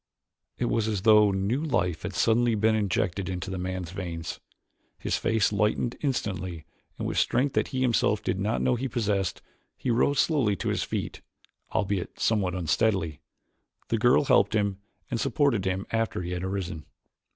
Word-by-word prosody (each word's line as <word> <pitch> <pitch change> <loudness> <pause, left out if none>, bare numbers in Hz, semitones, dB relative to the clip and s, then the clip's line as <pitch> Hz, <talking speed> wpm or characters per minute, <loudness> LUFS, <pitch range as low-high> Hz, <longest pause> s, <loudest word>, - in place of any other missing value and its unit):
It 125 - 0
was 115 -2 +1
as 105 -4 -2
though 105 -2 +6
new 100 +9 0
life 90 - 0
had - - -5
suddenly 115 0 +3
been 110 +1 +3
injected 100 -2 0
into 95 +1 -4
the 95 - -3
man's 90 -2 -4
veins. 85 -4 -5 0.6
His - - -1
face 110 -2 +1
lightened 105 +4 +1
instantly 95 - -2 0.3
and - - -3
with - - 0
strength 130 +4 +1
that - - +1
he 130 -1 -3
himself 115 -4 +2
did 95 - -1
not 105 +4 0
know 125 - +3
he 125 +3 -1
possessed 105 -7 -1 0.3
he 125 - -1
rose 135 +4 +2
slowly 130 -11 +2
to - - -3
his - - 0
feet, - - -4 0.5
albeit 100 -3 -2
somewhat 100 -5 +1
unsteadily. 85 -2 0 0.7
The 115 - +1
girl 120 +5 +4
helped 115 - +4
him 100 -2 0 0.3
and 120 - -1
supported 135 - +1
him 95 +1 -1
after 115 -5 -1
he 90 - -4
had 90 0 -3
arisen. 95 -5 -4
105 Hz, 170 wpm, -27 LUFS, 95-115 Hz, 0.7 s, though